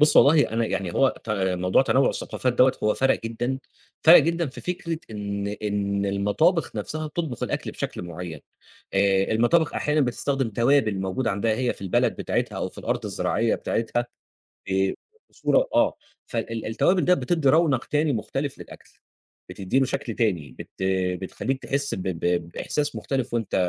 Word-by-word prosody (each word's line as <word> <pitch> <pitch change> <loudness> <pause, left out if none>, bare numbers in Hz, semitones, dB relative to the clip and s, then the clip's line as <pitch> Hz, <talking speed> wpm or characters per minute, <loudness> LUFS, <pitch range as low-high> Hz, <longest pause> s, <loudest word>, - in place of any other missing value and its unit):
بُص، 150 0 +6
والله 145 +1 +6
أنا 115 0 +1
يعني 95 -5 -2
هو 135 - +3
ت 115 - -5
موضوع 95 0 +2
تنوُع 135 0 +3
الثقافات 125 - -1
دوّة، 125 +2 +5
هو 105 - +2
فرَق 135 0 +2
جدًا، 120 +3 -2 0.4
فرَق 165 +2 +9
جدًا 170 +2 +1
في 130 - -8
فكرة 170 -2 -3
إن 100 -1 -4
إن 100 -1 -2
المطابخ 105 - +1
نَفْسها 155 +9 -3
بتطبخ 155 -5 -4
الأكل - - -2
بشكل - - -5
معين. 85 -2 -7 0.5
آآ 95 0 +3
المطابخ 120 +9 +2
أحيانًا 150 0 +1
بتستخدم 135 0 0
توابل 115 -3 +2
موجودة 95 +6 -1
عندها 110 +3 0
هي 125 +1 0
في - - -9
البلد 95 -2 +1
بتاعتها، - - -2
أو - - -2
في - - -11
الأرض - - -2
الزراعية 115 +1 0
بتاعتها 120 +1 -2 0.6
ب 95 0 +1 0.4
بصورة - - +1
آه، - - +3 0.3
فال 115 -1 -4
التوابل 175 - +2
ده 180 - +5
بتدّي 165 -6 0
رونق 150 -4 +3
تاني 150 0 +1
مختلف 135 +5 -3
للأكل، - - -12 0.6
بتدّي 95 +7 -1
له 135 - +4
شكْل 115 - -3
تاني، 90 - -1
بت - - -8 0.5
بتخلّيك 130 +7 -3
تحس 140 +1 0
ب 95 - -5
ب 90 -3 -3 0.3
بإحساس 145 +11 -1
مختلف 130 -3 -2
وأنت 115 -3 -2
120 Hz, 160 wpm, -24 LUFS, 100-140 Hz, 0.6 s, فرَق